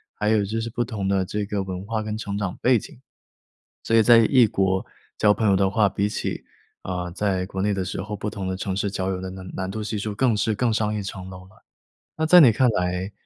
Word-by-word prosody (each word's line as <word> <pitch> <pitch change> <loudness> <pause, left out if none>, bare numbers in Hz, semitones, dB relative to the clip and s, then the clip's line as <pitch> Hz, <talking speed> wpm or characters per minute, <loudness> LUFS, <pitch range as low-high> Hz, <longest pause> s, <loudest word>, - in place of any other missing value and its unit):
还 105 - -1
有 110 -2 +3
就 110 +3 -3
是 115 - -4
不 120 - -1
同 110 -5 -4
的 95 -1 +1
这 105 +2 -3
个 100 0 -2
文 95 0 -6
化 110 +1 -2
跟 110 0 -4
成 100 -2 -4
长 100 -3 -3
背 125 -2 +4
景。 120 - -13 0.8
所 115 - +1
以 115 - +7
在 120 +1 +7
异 120 +2 +5
国 95 -2 0 0.3
交 105 -1 +4
朋 110 +1 0
友 100 - +4
的 95 0 +2
话， 105 0 +2
比 100 +1 -1
起， - - -4 0.4
啊， 90 -1 -4
在 95 0 -1
国 95 -1 -4
内 105 0 +1
的 95 -1 -2
时 90 - -5
候， 105 +1 -5
不 105 - -4
同 100 -2 -5
的 95 - -2
城 95 0 -3
市 100 0 -1
交 95 -1 -2
友 95 - -3
的 95 - -5
难 95 0 -9
难 95 0 -3
度 110 +2 -4
系 105 +1 -3
数 105 +1 -3
更 120 -1 +2
是 110 +1 +1
更 120 +2 +1
上 105 -1 0
一 105 - -2
层 95 -1 -7
楼 95 0 -11
了。 95 - -22 0.5
那 160 - 0
在 180 +3 +8
你 145 -7 +8
看 125 +3 +3
来 90 -1 -1
100 Hz, 275 characters per minute, -23 LUFS, 95-110 Hz, 0.8 s, 在